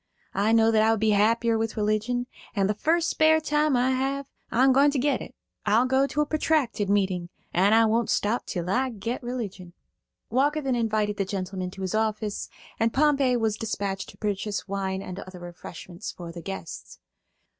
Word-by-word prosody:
I 205 +3 +2
know 225 0 +5
that 220 -1 +4
I 220 - +4
would 225 -1 +2
be 220 0 +3
happier 225 +2 +3
with 225 0 -2
religion, 215 +4 0 0.3
and 195 -2 +2
the 210 - +1
first 330 +10 +1
spare 315 0 +4
time 300 -2 +1
I 250 +2 +2
have 270 +2 -1 0.2
I'm 260 +3 +4
going 280 +2 +5
to 285 - -1
get 285 +3 +1
it. - - -9 0.3
I'll 220 +4 +3
go 265 +1 +2
to 295 - -1
a - - +2
protracted 295 -9 0
meeting, 190 -4 +1 0.2
and 215 +5 +5
won't 230 0 +1
stop 215 +4 0
till 175 -3 -3
I 255 +7 +1
get 230 +1 -4
religion." 210 -8 -5 0.6
Walker 285 +5 +2
then 270 -4 -1
invited 215 -3 0
the 195 - 0
gentlemen 185 -1 -4
to 190 +1 -8
his 185 - -2
office, 215 -1 -1 0.3
and 225 0 +2
Pompey 275 -3 +3
was 220 -2 0
dispatched 200 -3 -3
to - - -14
purchase 205 -1 -2
wine 195 -1 -2
and 185 +1 -7
other 185 -2 -9
refreshments 175 +2 -8
for 170 -2 -9
the 170 0 -8
guests. 95 - -7
220 Hz, 190 wpm, -26 LUFS, 195-255 Hz, 0.6 s, know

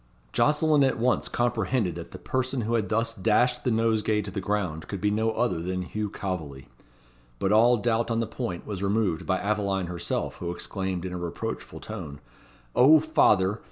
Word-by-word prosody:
Jocelyn 150 -1 +3
at 135 - +2
once 125 +2 +1
comprehended 120 -4 0
that - - -8
the - - -9
person 130 0 -2
who 115 +1 -2
had 110 -3 0
thus 115 +1 0
dashed 120 +4 +2
the - - +1
nosegay 110 -2 +1
to 100 - -6
the 95 - -3
ground 95 -6 -2
could 100 - -5
be 105 +3 +1
no 110 +2 +1
other 110 -8 0
than 90 +1 -2
Hugh 105 +3 -3
Calveley. 80 -10 -5 0.7
But 95 - 0
all 120 +3 +5
doubt 115 +1 0
on 115 -1 0
the 115 - +1
point 90 -5 -5
was 100 -3 -5
removed 100 -4 0
by 95 - +2
Aveline 100 -2 -1
herself 85 -1 -3
who 85 - -4
exclaimed 95 +1 -3
in 90 - -4
a 90 - -4
reproachful 85 -1 -5
tone 70 -1 -7 0.6
"O 150 +5 +7
father! 110 - +3
105 Hz, 185 wpm, -26 LUFS, 95-120 Hz, 0.7 s, O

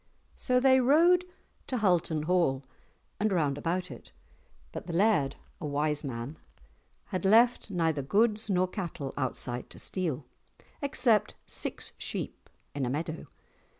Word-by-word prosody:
So 250 -1 +2
they 260 0 +5
rode 335 +8 +5 0.4
to 255 - -1
Hulton 175 -7 +1
Hall 155 -6 +1 0.5
and 215 +1 +1
round 150 -7 +1
about 175 +5 -2
it, - - -11 0.6
but - - -7
the 170 - -4
laird, 170 -7 +3 0.2
a 155 - -4
wise 150 +1 0
man, 130 +2 -5 0.7
had 185 -2 -3
left 230 +4 +4
neither 165 -6 0
goods 215 - +1
nor 185 -1 +2
cattle 170 -8 -5
outside 125 -2 -3
to - - -7
steal, 160 -8 -2 0.6
except 245 -6 +2
six - - 0
sheep - - -5 0.2
in 140 - -2
a 125 - 0
meadow. 155 +4 -4
175 Hz, 135 wpm, -29 LUFS, 145-215 Hz, 0.7 s, they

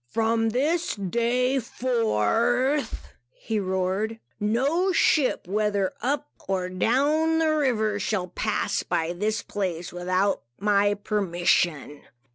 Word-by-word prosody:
"From 225 - +1
this 300 +9 0
day 235 +6 0
forth," 245 - 0 0.3
he 225 - -2
roared, 190 +4 -1 0.2
"no 275 - +1
ship, 300 - +2
whether 205 -1 0
up 285 +4 -1 0.2
or 185 -1 -1
down 285 - +2
the 315 -1 +2
river, 220 -8 +1
shall 195 -3 -1
pass 180 - -1
by 165 +1 -1
this 210 +4 -1
place, 180 -4 -4
without 185 +3 0 0.2
my 205 0 +2
permission. 175 -7 0
215 Hz, 105 wpm, -25 LUFS, 190-255 Hz, 0.3 s, ship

